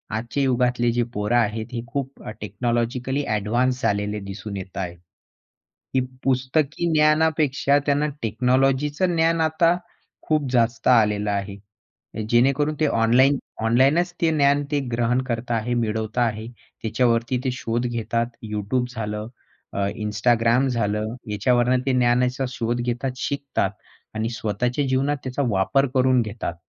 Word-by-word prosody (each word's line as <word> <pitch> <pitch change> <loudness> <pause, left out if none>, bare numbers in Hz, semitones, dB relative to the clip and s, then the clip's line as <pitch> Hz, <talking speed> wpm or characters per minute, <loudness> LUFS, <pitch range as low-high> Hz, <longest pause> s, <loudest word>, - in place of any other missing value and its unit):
आजच्या 120 +5 -2
युगातले 125 -2 +2
जे 120 +1 +1
पोरं 105 +3 0
आहेत, 110 -1 0
हे 115 - -2
खूप 135 0 -5 0.2
टेक्नॉलॉजिकली 120 +6 -1
ॲडवान्स 120 +5 0
झालेले 105 -1 0
दिसून 100 +1 -6
येत 95 -1 -8
आहेत. 90 -2 -4 1.0
ही 130 - +5 0.2
पुस्तकी 140 +6 0
ज्ञानापेक्षा 155 -2 +3
त्यांना 145 +1 +2
टेक्नॉलॉजीचं 135 - +1
ज्ञान 165 0 +2
आता 160 +2 +3 0.5
खूप 150 -4 +1
जास्त 120 -1 +1
आलेलं 105 -4 +3
आहे. 100 0 -3 0.7
जेणेकरून 140 +6 +3
ते 155 - +3
ऑनलाईन 130 +4 +4 0.3
ऑनलाईनच 135 +10 +3
ते 165 - +4
ज्ञान 145 -1 +3
ते 145 - +2
ग्रहण 120 +2 +1
करत 120 0 -3
आहेत, 115 +1 0
मिळवत 110 0 -2
आहेत. 115 -2 0 0.3
त्याच्यावरती 120 +2 +1
ते 130 - 0
शोध 120 -1 -2
घेतात, 115 0 -1 0.3
YouTube 105 +4 -1
झालं, 105 -1 -4 0.5
अ, 100 0 0 0.2
Instagram 115 +4 +2
झालं, 110 -1 -1 0.2
याच्यावरून 120 +4 +2
ते 135 - +1
ज्ञानाचा 125 +2 +2
शोध 120 -1 -2
घेतात, 120 +2 -2
शिकतात 140 +1 -1 0.4
आणि 110 +1 -1
स्वतःच्या 120 +4 -1
जीवनात 135 +3 +1
त्याचा 130 +2 -3
वापर 105 +8 +2
करून 130 -1 +3
घेतात. 110 -5 -4
120 Hz, 130 wpm, -23 LUFS, 110-135 Hz, 1.0 s, ही